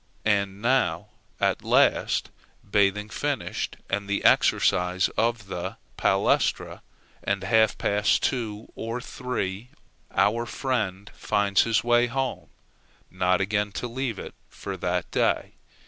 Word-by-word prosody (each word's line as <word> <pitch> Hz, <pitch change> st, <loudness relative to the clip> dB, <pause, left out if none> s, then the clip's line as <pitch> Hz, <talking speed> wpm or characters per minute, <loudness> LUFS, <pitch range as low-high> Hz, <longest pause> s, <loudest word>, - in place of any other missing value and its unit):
And 100 Hz, -1 st, 0 dB
now, 115 Hz, -10 st, +1 dB, 0.3 s
at -, -, +1 dB
last, -, -, +2 dB, 0.4 s
bathing 100 Hz, +1 st, +2 dB
finished, -, -, -3 dB
and 100 Hz, +1 st, -2 dB
the 100 Hz, -, -1 dB
exercises 90 Hz, 0 st, +3 dB
of 115 Hz, -2 st, -1 dB
the 90 Hz, -2 st, -5 dB, 0.2 s
palæstra, -, -, +1 dB, 0.4 s
at 100 Hz, -1 st, -1 dB
half 110 Hz, +2 st, +3 dB
past 105 Hz, 0 st, +1 dB
two, 110 Hz, -4 st, -2 dB
or 115 Hz, +2 st, -4 dB
three, 120 Hz, -4 st, -4 dB, 0.4 s
our 115 Hz, +3 st, +1 dB
friend 105 Hz, -8 st, -2 dB
finds 100 Hz, -1 st, +2 dB
his 115 Hz, -1 st, +1 dB
way 120 Hz, 0 st, +4 dB
home 120 Hz, -, -3 dB, 0.6 s
not 90 Hz, 0 st, +1 dB
again 105 Hz, +1 st, 0 dB
to 125 Hz, -, -3 dB
leave 120 Hz, -2 st, -3 dB
it -, -, -8 dB, 0.2 s
for 100 Hz, -, -6 dB
that 90 Hz, -1 st, -2 dB
day. -, -, +1 dB
105 Hz, 120 wpm, -26 LUFS, 95-115 Hz, 0.6 s, way